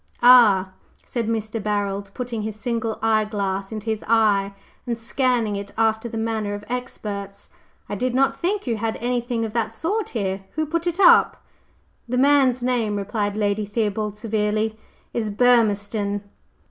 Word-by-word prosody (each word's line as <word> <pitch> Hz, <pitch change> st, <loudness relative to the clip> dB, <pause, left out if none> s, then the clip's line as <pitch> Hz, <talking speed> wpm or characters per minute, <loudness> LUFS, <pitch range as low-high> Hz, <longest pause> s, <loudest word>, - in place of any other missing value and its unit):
"Ah!" 215 Hz, -7 st, +7 dB, 0.3 s
said 235 Hz, -3 st, -3 dB
Mr. 220 Hz, 0 st, -2 dB
Barold, 200 Hz, -1 st, -2 dB
putting 240 Hz, -3 st, -4 dB
his 215 Hz, 0 st, -4 dB
single 225 Hz, 0 st, -2 dB
eyeglass 210 Hz, -3 st, 0 dB
into 215 Hz, -1 st, -6 dB
his 220 Hz, -2 st, -2 dB
eye, 205 Hz, -3 st, +3 dB, 0.3 s
and 235 Hz, -1 st, -1 dB
scanning 235 Hz, -2 st, 0 dB
it 200 Hz, 0 st, -5 dB
after 225 Hz, +1 st, +1 dB
the 225 Hz, -, -5 dB
manner 220 Hz, -2 st, -2 dB
of 205 Hz, -, -8 dB
experts. 205 Hz, -5 st, -6 dB, 0.4 s
"I -, -, -5 dB
did 250 Hz, +5 st, -1 dB
not 270 Hz, +1 st, +2 dB
think 395 Hz, +4 st, -1 dB
you 235 Hz, -3 st, -1 dB
had 220 Hz, +1 st, -2 dB
any 245 Hz, +1 st, -1 dB
thing 235 Hz, -1 st, -2 dB
of 215 Hz, -, -6 dB
that 225 Hz, -1 st, -1 dB
sort 405 Hz, -, -2 dB
here. 195 Hz, -4 st, -3 dB
Who 315 Hz, 0 st, -1 dB
put 335 Hz, +3 st, -2 dB
it 345 Hz, +2 st, -2 dB
up?" 390 Hz, -, +5 dB, 0.7 s
"The 250 Hz, -, 0 dB
man's 265 Hz, -2 st, +4 dB
name," 235 Hz, -4 st, 0 dB
replied 205 Hz, +1 st, -2 dB
Lady 210 Hz, 0 st, 0 dB
Theobald 210 Hz, -1 st, -2 dB
severely, 215 Hz, 0 st, -1 dB, 0.4 s
"is 220 Hz, -2 st, -1 dB
Burmistone." 205 Hz, -3 st, +2 dB
220 Hz, 160 wpm, -23 LUFS, 205-240 Hz, 0.7 s, Ah